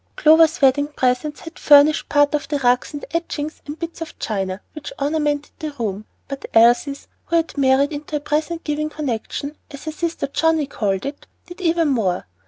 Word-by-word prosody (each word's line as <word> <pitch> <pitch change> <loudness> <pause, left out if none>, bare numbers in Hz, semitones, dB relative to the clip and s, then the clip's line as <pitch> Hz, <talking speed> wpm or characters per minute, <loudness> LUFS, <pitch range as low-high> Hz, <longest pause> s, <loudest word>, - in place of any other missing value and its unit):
Clover's 320 +1 +5
wedding 280 +2 +4
presents 290 +1 -1
had 330 +3 -11
furnished 295 +1 +5
part 290 0 +3
of 300 - -1
the 295 - -1
rugs 250 -2 +1
and 290 -1 -7
etchings 315 -2 -3
and 295 +2 -6
bits 335 0 -7
of 325 - -7
china 195 -3 -3
which 305 - -8
ornamented 295 0 -1
the 310 -2 -5
room, 215 -5 -4 0.2
but 275 -1 -6
Elsie's, 240 +5 +4 0.2
who 335 - -1
had 330 -1 0
married 275 +1 +3
into 300 +1 -5
a - - +1
"present 310 +3 -2
giving 300 0 -2
connection," 285 0 -4
as 280 +1 -10
her 315 - -3
sister 335 0 -3
Johnnie 320 +2 +1
called 200 -6 -2
it, 285 +1 -7 0.2
did 355 +1 -11
even 335 -2 +2
more. 205 -9 0
290 Hz, 185 wpm, -21 LUFS, 270-315 Hz, 0.2 s, Clover's